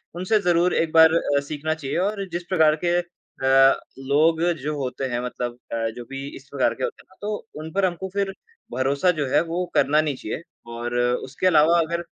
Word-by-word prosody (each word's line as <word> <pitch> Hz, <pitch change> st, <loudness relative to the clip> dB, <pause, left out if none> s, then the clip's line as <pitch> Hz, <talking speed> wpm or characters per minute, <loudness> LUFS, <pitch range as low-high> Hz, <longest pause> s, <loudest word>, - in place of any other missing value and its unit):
उनसे 185 Hz, +5 st, +1 dB
ज़रूर 175 Hz, +1 st, +3 dB
एक 165 Hz, -1 st, +1 dB
बार 160 Hz, 0 st, +7 dB
अ, 145 Hz, -4 st, +2 dB
सीखना 155 Hz, +1 st, -2 dB
चाहिए 140 Hz, -2 st, -4 dB
और 205 Hz, -2 st, -3 dB
जिस 175 Hz, +1 st, -3 dB
प्रकार 160 Hz, -4 st, +4 dB
के 175 Hz, 0 st, +2 dB
अ, 135 Hz, -6 st, +2 dB, 0.2 s
लोग 155 Hz, +4 st, +2 dB, 0.2 s
जो 150 Hz, +1 st, -2 dB
होते 130 Hz, 0 st, -3 dB
हैं 120 Hz, -, 0 dB
मतलब 120 Hz, -1 st, -4 dB, 0.2 s
अ, 115 Hz, -1 st, -1 dB
जो 120 Hz, -, -8 dB
भी 135 Hz, +1 st, -6 dB
इस 135 Hz, -, -13 dB
प्रकार 140 Hz, -2 st, +1 dB
के 130 Hz, -, -6 dB
होते -, -, -4 dB
हैं -, -, -41 dB
ना, 190 Hz, -, -20 dB
तो 210 Hz, +1 st, -4 dB
उन 160 Hz, +1 st, -7 dB
पर 195 Hz, -1 st, +2 dB
हमको 185 Hz, +1 st, -3 dB
फिर 200 Hz, -1 st, -1 dB, 0.4 s
भरोसा 140 Hz, +7 st, +1 dB
जो 145 Hz, -, +1 dB
है, -, -, +3 dB
वो 170 Hz, +2 st, -2 dB
करना 150 Hz, +2 st, +4 dB
नहीं 150 Hz, -3 st, -2 dB
चाहिए 130 Hz, +6 st, -5 dB, 0.3 s
और 120 Hz, +1 st, -4 dB
उसके 125 Hz, +6 st, 0 dB
अलावा, 165 Hz, 0 st, +5 dB
अगर 170 Hz, +1 st, -2 dB
155 Hz, 205 wpm, -23 LUFS, 135-175 Hz, 0.4 s, बार